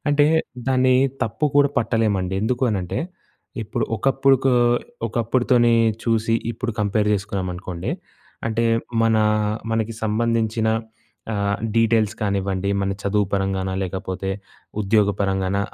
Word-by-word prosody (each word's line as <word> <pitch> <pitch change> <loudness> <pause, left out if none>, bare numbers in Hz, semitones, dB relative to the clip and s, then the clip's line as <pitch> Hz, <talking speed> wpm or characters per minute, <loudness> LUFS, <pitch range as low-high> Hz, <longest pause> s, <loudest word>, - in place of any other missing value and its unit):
అంటే, 145 0 +4 0.4
దాన్నీ 130 -1 +3 0.3
తప్పు 115 +7 0
కూడా 145 0 +5
పట్టలేమండి. 105 -5 0
ఎందుకూ 125 +3 -1
అనంటే, 90 -3 -2 0.6
ఇప్పుడు 110 +1 -2
ఒకప్పుడుకో 135 +2 +3 0.5
ఒకప్పుడుతోనే 120 +1 +2 0.3
చూసి, 115 -1 +1 0.2
ఇప్పుడు 115 +1 -4
కంపేర్ 105 +1 +1
చేసుకున్నామనుకోండి. 95 -3 -4 0.6
అంటే, 115 +1 0 0.4
మనా 110 -1 +3 0.5
మనకి 115 0 -1
సంబంధించిన 110 0 0 0.6
ఆహ్, 100 -1 0 0.2
డీటెయిల్స్ 110 -2 +3
కానివ్వండి, 100 -1 -1
మన 100 0 0
చదువు 100 0 +1
పరంగానా, 95 -1 -1
లేకపోతే 95 0 -4 0.5
ఉద్యోగ 105 0 +3
పరంగానా, 95 0 0
110 Hz, 105 wpm, -22 LUFS, 100-115 Hz, 0.6 s, కూడా